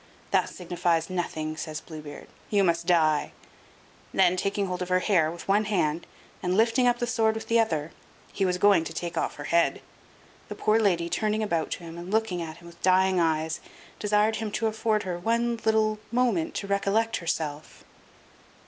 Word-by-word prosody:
"This - - +1
signifies 175 -1 -1
nothing," 155 -3 -3
says 155 -1 -5
Blue 160 -2 -9
Beard; 145 -1 -10 0.2
"you 205 -2 +3
must 170 -1 +1
die"; 155 -4 +2 0.8
then, 175 - +4
taking 200 +2 -1
hold 180 -1 -4
of 180 - -3
her 185 - +4
hair 175 -7 +3
with 170 +1 -9
one 205 +2 +3
hand, 170 -6 0 0.3
and 180 +1 0
lifting 230 +3 +3
up 240 0 +3
the 240 - -1
sword 225 -2 +1
with 220 - -6
the 230 0 +3
other, 160 -8 0 0.4
he 195 - -1
was 180 -1 +1
going 200 -3 +5
to 165 - -6
take 170 +1 -4
off - - -1
her - - -7
head. 170 0 +2 0.7
The - - -5
poor 215 +1 +2
lady, 175 -6 +2
turning 215 +3 0
about 170 -6 -1
to - - -8
him, 165 0 -8
and 175 +2 -8
looking 215 -4 0
at 160 -1 -6
him 170 - -16
with 170 0 -14
dying 185 0 +3
eyes, 160 -1 0 0.4
desired 210 +1 +2
him 215 -1 -4
to 225 - -1
afford 220 -1 0
her 180 -2 -4
one 235 +4 0
little 215 -1 +2
moment 255 +7 +1
to 200 - -3
recollect 200 +3 +1
herself. 155 -3 -4
185 Hz, 190 wpm, -27 LUFS, 170-215 Hz, 0.8 s, going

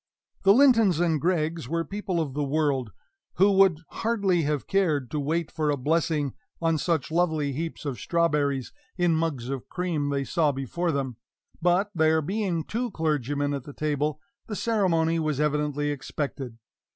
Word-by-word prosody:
The 195 0 +6
Lintons 230 - +5
and 165 -4 +1
Greggs 165 -4 0
were 165 +1 -1
people 200 -3 -3
of 150 -5 -2
the 145 +1 -1
world, 140 -5 0 0.4
who 195 +2 +5
would 190 -5 +4
hardly 200 -6 +1
have 150 -2 -1
cared 155 -10 +1
to 150 - -1
wait 160 +3 -1
for 155 -1 -1
a 145 - +1
blessing 150 0 0 0.3
on 165 -2 +1
such 160 -3 0
lovely 160 -4 +1
heaps 160 +2 -5
of 135 -4 -3
strawberries, 145 -6 0 0.2
in 175 -2 +3
mugs 155 -7 -1
of 135 -2 -5
cream 170 -6 -1
they 140 -1 0
saw 155 +1 +1
before 140 +6 -2
them; 135 -5 -2 0.4
but, 180 +4 +2
there 160 -2 +3
being 185 -2 -1
two 235 +8 -2
clergymen 145 - -1
at 140 - -2
the 145 - -10
table, 150 0 -1 0.3
the 210 - -4
ceremony 170 -8 +1
was 155 -3 -1
evidently 150 -1 0
expected. 140 -3 -5
155 Hz, 165 wpm, -26 LUFS, 145-175 Hz, 0.4 s, The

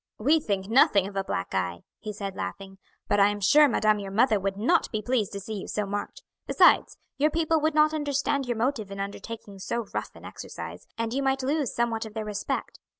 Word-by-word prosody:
"We 295 +9 +3
think 200 -9 -2
nothing 210 -4 +5
of 200 - -10
a 195 - 0
black 90 - -4
eye," 90 -2 -2 0.2
he 215 0 -5
said 200 -2 -6
laughing, 195 -1 -6 0.3
"but 205 - +2
I 200 - +7
am 205 0 -3
sure 295 +10 +6
madame 215 -4 +2
your 200 -1 -6
mother 215 +2 +3
would 195 0 -2
not 265 - +2
be 215 - -1
pleased 220 -2 0
to 200 - -4
see 205 +3 -7
you - - -8
so 210 - -2
marked; 205 - -5 0.2
besides, - - +4 0.2
your 300 +2 +4
people 320 0 +1
would 310 0 +1
not 305 0 +4
understand 285 -2 -1
your 240 -2 -1
motive 230 -3 -1
in 195 0 -7
undertaking 200 0 -7
so 235 +4 -3
rough - - -4
an - - -13
exercise, - - -8
and 230 0 -2
you 275 - 0
might 270 -1 0
lose 285 -1 0
somewhat 230 -2 -1
of 215 - -14
their 220 -1 -3
respect. 210 -1 -4
220 Hz, 220 wpm, -27 LUFS, 200-275 Hz, 0.3 s, I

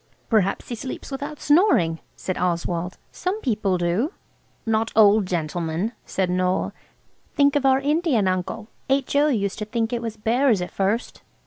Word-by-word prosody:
"Perhaps 200 -4 +1
he - - -3
sleeps 255 +4 -6
without 285 +2 -5
snoring," 290 - +3 0.2
said 185 - -4
Oswald, 175 0 -2
"some 370 +4 -3
people 210 - 0
do." 180 - 0 0.5
"Not 225 0 +1
old 210 -2 +5
gentlemen," 170 +3 -2 0.2
said 190 -1 0
Noël; 180 +1 0 0.6
"think 285 -2 +4
of 280 -2 +3
our 265 0 +5
Indian 285 - +1
uncle–H.O. 235 +9 0
used 200 -8 -1
to 210 - -3
think 225 +2 -2
it 235 - -1
was 225 -2 -5
bears 230 +1 +2
at 180 - -4
first." 200 +5 -1
220 Hz, 145 wpm, -23 LUFS, 185-270 Hz, 0.6 s, old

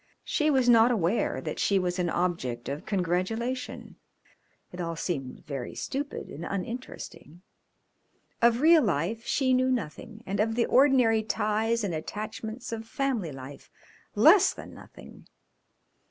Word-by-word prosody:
She 305 0 +1
was 265 -4 +2
not 230 -1 +6
aware 210 -2 0
that - - -5
she 200 - +2
was 180 0 -1
an 175 -1 0
object 165 -10 -2
of 145 +5 -5
congratulation. 210 +7 -2 0.7
It 180 - -6
all 165 -1 -3
seemed 140 -6 -4
very 135 -4 -5
stupid 285 0 -4
and 160 - -8
uninteresting. 185 - -7 1.0
Of 235 +1 +4
real 320 +1 +7
life 205 - -1
she 260 -2 +2
knew 255 0 +3
nothing 225 0 -4
and 195 +1 -3
of 225 +1 +1
the 235 - +2
ordinary 250 -5 +4
ties 220 +1 0
and 195 -4 -2
attachments 215 +8 -6
of 225 0 -5
family 240 - -2
life 135 +1 -10 0.5
less - - +6
than - - -10
nothing. - - -14
215 Hz, 140 wpm, -28 LUFS, 175-240 Hz, 1.0 s, real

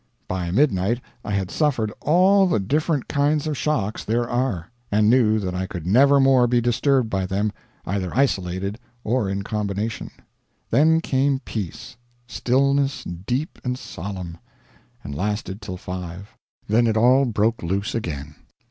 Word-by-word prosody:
By 90 -2 -2
midnight 105 - +2 0.2
I 105 - -4
had 95 -2 -1
suffered 125 -9 0
all 190 +4 +4
the 140 - +1
different 145 - 0
kinds 145 +1 +1
of 155 -1 -1
shocks 110 -9 -1
there 120 +2 0
are, 120 -8 -2 0.2
and 105 +1 +4
knew 115 -4 +4
that 95 -4 -2
I 95 +1 -2
could 85 -4 -7
never 140 +9 +5
more 135 -2 +5
be 120 0 +3
disturbed 120 +2 +2
by 95 -3 -1
them, 100 +3 0 0.3
either 95 -1 -2
isolated 100 -5 0 0.2
or 115 -3 0
in 100 0 -2
combination. 105 +1 -3 0.6
Then 160 +3 +4
came 135 -2 +1
peace 115 - -6 0.3
stillness 135 +6 +1
deep 120 - -4
and 125 0 -2
solemn 90 -6 -7 0.6
and 70 - -6
lasted 105 +4 -3
till 90 - -6
five. 90 +1 -7 0.3
Then 115 +3 +3
it 110 -1 +1
all 130 +4 +5
broke 115 -1 0
loose 100 +7 -2
again. 75 -9 -4
110 Hz, 150 wpm, -23 LUFS, 95-135 Hz, 0.6 s, never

